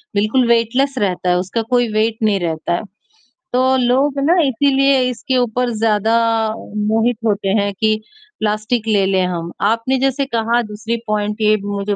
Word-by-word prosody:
बिल्कुल 215 +5 +2
वेटलेस 240 +4 +1
रहता 185 -3 -1
है, 180 - +3
उसका 190 +5 -2
कोई 245 -1 +3
वेट 220 +1 +1
नहीं 210 -2 +2
रहता 165 -1 -2
है। - - -3 0.7
तो 260 +1 +3
लोग 265 +3 +1
ना 330 +6 +3
इसीलिए 275 +1 +2
इसके 255 +2 -2
ऊपर 245 0 0
ज़्यादा 220 0 +1 0.7
मोहित 225 +2 +1
होते 205 -2 0
हैं 200 0 -1
कि 215 0 +2 0.4
प्लास्टिक 215 +2 -1
ले 205 -3 +2
ले 190 -1 +1
हम, 175 -2 -3
आपने 230 +5 +1
जैसे 270 +1 0
कहा 230 +1 +1
दूसरी 215 +2 -4
पॉइंट 210 +1 -2
ये 215 0 +4
भी 200 0 -8
मुझे 200 0 -2
220 Hz, 165 wpm, -18 LUFS, 205-250 Hz, 0.7 s, ये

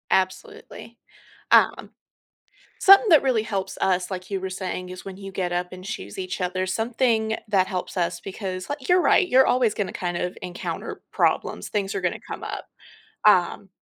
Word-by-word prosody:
Absolutely, 425 - -2 0.5
um - - +4 0.9
something 395 +3 +7
that 315 -5 +7
really 255 -5 +2
helps 195 -3 -3
us, 180 0 +1
like 185 -1 -6
you 195 -2 -2
were 190 0 -5
saying, 185 -1 -4
is 185 0 -9
when 190 -1 -8
you 195 0 -8
get 185 -2 -2
up 180 +1 -2
and 185 0 -10
choose 100 - -6
each 185 +1 -4
other, 185 +1 -1
something 225 +1 0
that 195 -3 +3
helps 185 0 -5
us 175 -1 -1
because, 190 -2 -6
like, 285 -2 -5
you're 360 0 +5
right, 365 - +4
you're 260 -2 +5
always 245 -4 +3
gonna 205 -3 -3
kind 175 -1 -3
of 180 +1 -3
encounter 180 -1 -5
problems, - - 0
things 200 -2 -2
are 195 - -2
gonna 180 -1 -1
come - - -7
up, - - -5 0.6
um 195 0 +3
190 Hz, 180 wpm, -24 LUFS, 185-225 Hz, 0.9 s, something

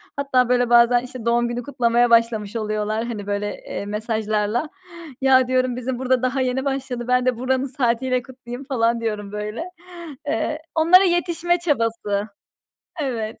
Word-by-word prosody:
Hatta 260 -3 +1
böyle, 245 -1 +2
bazen 240 0 +5
işte, 250 -2 -9
doğum 235 0 +2
günü 240 +1 -4
kutlamaya 240 -2 +2
başlamış 230 -2 +2
oluyorlar 215 0 -2
hani 215 -4 -6
böyle, 205 0 -1 0.2
eee, - - -4
mesajlarla. 215 +4 -1 0.5
Ya 260 -1 +5
diyorum 255 -1 +1
bizim 250 0 -4
burada 260 -1 +1
daha 255 +1 0
yeni 260 +1 -1
başladı, 265 -3 -3
ben 250 0 +2
de 255 -2 +1
buranın 260 +2 0
saatiyle 255 -1 0
kutlayayım 255 0 -9
falan 235 -4 +1
diyorum 210 -3 -3
böyle. 210 +8 -4 0.6
Eee, 305 +7 -1
onlara 340 +4 +6
yetişme 345 -1 +1
çabası. 230 - -1 0.8
Evet. 230 -5 -3
245 Hz, 150 wpm, -22 LUFS, 225-260 Hz, 0.8 s, onlara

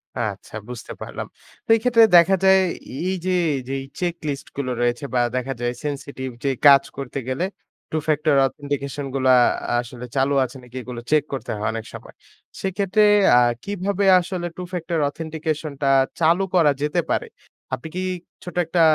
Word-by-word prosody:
আচ্ছা, 105 -4 -4 0.2
বুঝতে 125 -2 -8
পারলাম। - - -6 0.4
তো - - -32
এই - - 0
ক্ষেত্রে 240 -2 +6
দেখা 170 +3 +6
যায় 190 0 +6 0.5
এই 190 - 0
যে 185 - +1 0.4
যেই 135 0 -2 0.2
চেকলিস্ট 165 -5 -3
গুলো 135 -3 -2
রয়েছে 120 +3 0
বা 125 - +2 0.2
দেখা 130 +1 -2
যায় 120 0 0
সেনসিটিভ 140 -2 -4
যে 140 - +1 0.2
কাজ 140 -1 +8
করতে 140 0 -4
গেলে 135 +8 -1 0.5
two 155 - -1
factor 150 -1 +2
authentication 140 +1 -4
গুলা 130 -1 +3 0.5
আসলে 120 0 -7
চালু 135 +1 +2
আছে 130 +2 -10
নাকি 125 0 -16
এইগুলো 125 -1 -7
চেক 155 -2 +4
করতে 135 - -5
হয় 105 0 -2
অনেক 115 0 -5
সময়। - - -10 0.5
সেক্ষেত্রে 195 +2 +1 0.3
আ - - +8 0.2
কিভাবে 200 0 -1
আসলে 180 0 -4
two 180 - -5
factor 170 -1 -2
authentication 155 0 -4
টা 140 - +1 0.3
চালু 170 +3 +3
করা 165 -5 +5
যেতে 150 +4 +1
পারে? - - 0 0.5
আপনি 130 +4 -4
কি 185 - -1 0.4
ছোট 180 - -8
একটা 165 +2 +1
145 Hz, 165 wpm, -22 LUFS, 130-175 Hz, 0.5 s, কাজ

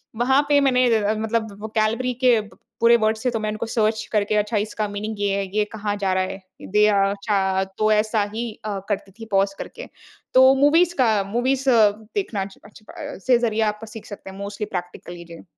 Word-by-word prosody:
वहाँ 265 +4 +3
पे 290 -1 +5
मैंने 255 -2 +3 0.3
मतलब 220 -1 -2
वोकैब्यलेरी 220 +3 0
के 240 -3 +6
प 210 - -15 0.2
पूरे 235 0 +6
वर्ड्स 220 +1 0
थे 250 - +4
तो 225 - -2
मैं 215 0 -2
उनको 215 +2 -4
सर्च 220 -1 0
करके 210 0 +1
अच्छा 210 +1 0
इसका 215 0 -2
मीनिंग 215 +2 -4
ये 205 0 0
है, 200 - -1
ये 210 - +4
कहाँ 205 -1 -2
जा 195 -2 0
रहा 185 0 +1
है? 190 - -5 0.2
दे 210 +2 +2
अ, 200 -1 +2 0.2
च 190 -1 +1
तो 215 0 +3
ऐसा 215 0 +1
ही 230 +2 -3 0.2
अ, 200 -2 -3
करती 200 -1 -3
थी 225 - -7
पॉज़ 195 0 +2
करके। - - -8 0.5
तो 260 +1 +7
मूवीज़ 325 +6 +4
का 215 -4 +3
मूवीज़ 260 +2 0
देखना 220 - +1
अच् 195 0 -7
अच् 210 +1 -16
अ, - - -8
से 250 -2 +6
ज़रिए 225 -2 0
आप 210 +1 -11
सीख 220 0 -10
सकते 200 -2 -9
हैं। 190 - -11
मोस्टली 200 +1 -5
प्रैक्टिकली 175 -1 -7
जी। 170 0 -12
215 Hz, 205 wpm, -22 LUFS, 200-235 Hz, 0.5 s, तो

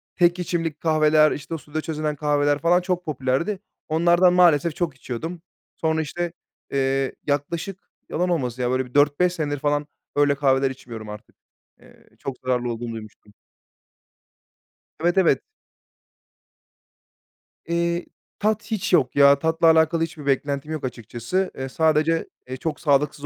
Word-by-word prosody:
tek 175 0 +3
içimlik 165 -3 -2
kahveler, 155 -1 +4
işte, 150 +3 -5
o - - -1
suda 155 +1 -5
çözünen 155 -1 -2
kahveler 145 0 +1
falan 175 +2 +3
çok 180 0 -2
popülerdi. 150 +7 -1 0.3
Onlardan 175 +3 +4
maalesef 170 -3 +4
çok 165 -6 -2
içiyordum. 160 +8 -6 0.3
Sonra, 160 0 0
işte, 175 +3 -4 0.4
eee, 135 0 0
yaklaşık 165 +7 -3 0.2
yalan 180 +2 0
olmasın 130 -7 -1
ya, 125 0 0
böyle 130 0 0
bir 125 - -16
4-5 145 +5 +3
senedir 145 -4 -2
falan 145 0 0 0.3
öyle 145 -1 +3
kahveler 135 -1 +2
içmiyorum 115 -5 -9
artık. 105 0 -10 0.4
Eee, - - -21
çok 135 -2 -5
zararlı 125 -1 0
olduğunu 115 0 -5
duymuştum. 110 -1 -11 1.7
Evet, 175 +3 +1
evet. 185 -3 +4 2.3
Eee, 170 +1 0 0.3
tat 215 0 +1
hiç 200 -3 -1
yok 130 -6 +3
ya. 140 0 +6
Tatla 160 +2 +2
alakalı 160 +1 +4
hiçbir 160 -3 -6
beklentim 140 +2 -1
yok 155 -4 -3
açıkçası. 120 - -3
Eee, 130 0 -4
sadece, 160 +2 +2 0.2
eee, 130 - -4
çok 155 +1 -3
sağlıksız 145 -1 +1
150 Hz, 140 wpm, -23 LUFS, 135-170 Hz, 2.3 s, ya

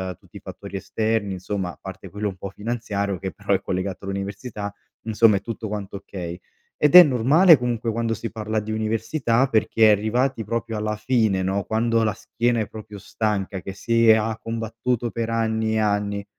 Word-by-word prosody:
uhm, - - -34
tutti - - -15
i - - -12
fattori 95 - -8
esterni 110 0 -1
insomma, 95 0 -3
a - - -17
parte 95 -1 -9
quello 105 +1 -3
un 95 - -9
po' 100 - -6
finanziario, 100 -3 -3
che 95 0 -4
però 100 0 -1
è 95 - +1
collegato 95 +1 -3
all'università, 100 +2 -5 0.3
insomma 110 -2 +4
è - - -5
tutto 115 +1 -5
quanto 100 -1 -5
okay, 90 -3 -7 0.4
ed 150 +1 +3
è 180 - +14
normale 150 +6 +5
comunque 120 -2 -2
quando 115 0 -1
si 115 +2 -5
parla 110 -1 -2
di 105 +1 -5
università 115 +4 0
perché 110 -2 +3
arrivati 115 +4 +1
proprio 115 +1 -3
alla 105 0 -2
fine 110 -4 +1
no, 95 +1 0
quando 115 +1 +1
la 105 -2 +1
schiena 120 +3 -1
è 105 - -3
proprio 105 -1 -10
stanca 100 -2 -2
che 95 - -7
si 115 +3 +1
e 110 - +9
ha 110 0 -1
combattuto 115 +2 -2
per 115 -1 -3
anni 110 -1 0
e - - +2
anni. 100 -1 0
110 Hz, 190 wpm, -23 LUFS, 100-115 Hz, 0.4 s, è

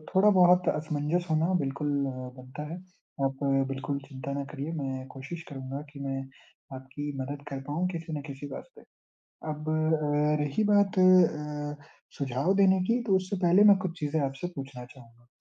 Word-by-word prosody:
थोड़ा 205 +2 +6
बहुत 180 -2 +5
असमंजस 155 +3 -1
होना 160 +4 +2
बिल्कुल 140 +2 -2 0.2
अ, 135 - -2 0.3
बनता 130 +4 -8
है। - - -4 0.5
आप 135 0 -2 0.3
बिल्कुल 135 +1 -3
चिंता 135 0 -6
ना 140 0 -2
करिए, 150 +2 -4
मैं 135 -3 -4
कोशिश 145 +6 -8
करूँगा 135 0 -6
कि 140 - -10
मैं 135 -1 -3 0.5
आपकी 135 +3 -6
मदद 140 +2 -5
कर 135 -1 -5
पाऊँ 170 +5 0
किसी 165 -2 -5
ना 145 - -3
किसी 140 +1 -7
बात 145 - -8
पे। - - -14 0.7
अब 155 +1 -5
अ, 150 -1 +2
रही 145 +9 0
बात 200 -1 +3
अ, 150 -5 +3 0.3
सुझाव 140 +7 +1
देने 190 -1 +5
की 235 +4 +1
तो 195 -2 +4
उससे 190 +2 -2
पहले 185 +4 +6
मैं 200 - +5
कुछ 170 -1 -7
चीज़ें 150 +1 0
आपसे 135 +6 -4
पूछना 135 -2 -7
चाहूँगा। 120 -1 -17
150 Hz, 170 wpm, -28 LUFS, 135-175 Hz, 0.7 s, थोड़ा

